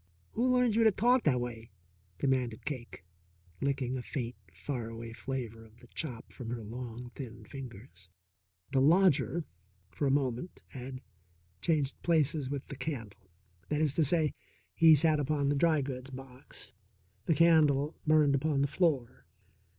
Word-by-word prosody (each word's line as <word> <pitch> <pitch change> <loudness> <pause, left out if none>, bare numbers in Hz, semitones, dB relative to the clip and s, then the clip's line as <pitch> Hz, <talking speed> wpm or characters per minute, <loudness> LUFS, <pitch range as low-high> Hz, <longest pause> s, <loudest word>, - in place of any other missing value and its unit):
"Who 250 +3 +1
learned 250 -3 +3
you 230 - +4
to 220 - +6
talk 245 +5 +3
that 145 -5 +4
a - - 0
way?" 120 -2 -5 0.5
demanded 125 -5 0
Cake, 120 - -6 0.6
licking 135 -2 0
a 130 - -3
faint, 125 -3 -4 0.2
far 115 +7 -4
away 115 0 -7
flavour 115 -3 -5
of 110 0 -18
the - - -16
chop 125 -8 -6
from 120 -4 -7
her 120 -1 -4
long, 120 +2 -7
thin 120 -5 -8
fingers. 120 -8 -10 0.6
The 135 - +3
lodger, 170 +1 +4 0.5
for 140 - -1
a - - +3
moment, 135 +3 -1
had 130 -1 -7 0.6
changed 145 +1 0
places 150 -4 +2
with 140 -1 -4
the 140 - -8
candle. 110 -10 -6 0.4
That 150 - 0
is 155 -3 +2
to 160 - +3
say, 155 0 +2 0.4
he 160 -1 +7
sat 155 +1 +3
upon 145 0 +1
the 145 - +2
dry 155 0 +3
goods 130 -1 -5
box, 130 -1 -9 0.6
the 165 - +4
candle 150 -2 +4
burned 155 -2 +5
upon 140 0 +1
the - - +2
floor. 140 -6 0
135 Hz, 160 wpm, -31 LUFS, 120-155 Hz, 0.6 s, he